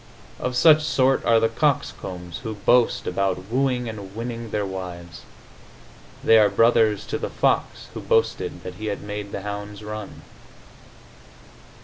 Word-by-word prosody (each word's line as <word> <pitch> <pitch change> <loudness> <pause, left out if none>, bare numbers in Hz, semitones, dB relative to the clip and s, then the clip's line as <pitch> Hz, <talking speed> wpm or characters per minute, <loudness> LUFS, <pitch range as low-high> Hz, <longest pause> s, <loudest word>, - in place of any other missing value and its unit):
Of 125 0 -2
such 155 +4 +6
sort 135 -3 +2
are 115 -1 +5
the 115 - +3
coxcombs 95 - -2
who 110 -3 -5
boast 120 +4 +2
about 95 +1 -2
wooing 125 -1 0
and 100 -3 -8
winning 115 0 -5
their 105 -1 -1
wives. 90 -3 -7 1.0
They 115 - +6
are 105 -1 +5
brothers 115 -3 +3
to - - -3
the - - -3
fox - - 0
who - - -6
boasted - - 0
that 90 - -6
he 110 - -3
had 100 - -3
made 105 -1 -6
the 100 - -5
hounds 105 0 -6
run.... 105 -1 -7
110 Hz, 145 wpm, -23 LUFS, 100-120 Hz, 1.0 s, such